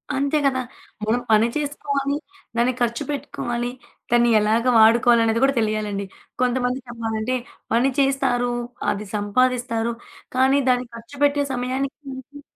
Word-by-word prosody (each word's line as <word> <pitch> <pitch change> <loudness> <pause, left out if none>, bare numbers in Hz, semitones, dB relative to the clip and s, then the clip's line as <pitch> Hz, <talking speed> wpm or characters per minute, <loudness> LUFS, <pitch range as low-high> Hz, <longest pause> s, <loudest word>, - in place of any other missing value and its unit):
అంతే 280 +3 +1
గదా! 260 -2 +2 0.4
మనం 230 +3 +1
పని 220 +1 +5
చేసుకోవాలి, 280 -1 -2 0.4
దాన్ని 240 +2 +2
ఖర్చు 235 -1 0
పెట్టుకోవాలి, 240 -3 -3 0.4
దాన్ని 240 0 +4
ఎలాగా 220 +4 +2
వాడుకోవాలనేది 230 0 +5
గూడా 275 0 +3
తెలియాలండి. 215 -2 -1 0.4
కొంతమంది 250 0 +1
చెప్పాలంటే 230 0 -2 0.4
పని 240 +4 +3
చేస్తారు. 245 -3 +1 0.4
అది 205 +1 -4
సంపాదిస్తారు. 235 +2 0 0.4
కానీ, 265 +2 +4
దాన్ని 250 0 +2
ఖర్చుపెట్టే 285 +5 0
సమయానికి 260 +2 -2 0.2
దాచి 275 +2 -11
245 Hz, 115 wpm, -22 LUFS, 230-270 Hz, 0.4 s, పని